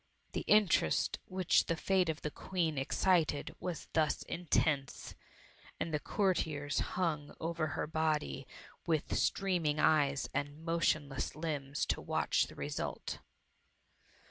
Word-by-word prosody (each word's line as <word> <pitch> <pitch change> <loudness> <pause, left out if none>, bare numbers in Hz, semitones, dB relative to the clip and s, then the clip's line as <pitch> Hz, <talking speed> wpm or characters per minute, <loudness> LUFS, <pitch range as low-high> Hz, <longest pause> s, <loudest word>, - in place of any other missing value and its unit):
The - - -2
interest 195 - +3
which 185 -2 +2
the 165 - +1
fate 185 0 +2
of 160 0 -3
the 150 - -2
Queen 170 -3 -1
excited 160 +1 +1
was 175 -3 -4
thus 155 -2 +2
intense, 155 -5 0 0.7
and 160 - -2
the 150 - +2
courtiers 150 -7 0 0.2
hung 155 -5 -1
over 165 -1 -1
her - - 0
body 155 -3 -1 0.4
with 160 -3 0
streaming 170 -6 +1
eyes 145 -3 +3
and 145 +3 -3
motionless 155 -4 0
limbs 145 -3 -2
to - - -1
watch - - +1
the - - -12
result. - - -4
155 Hz, 120 wpm, -34 LUFS, 145-170 Hz, 0.7 s, interest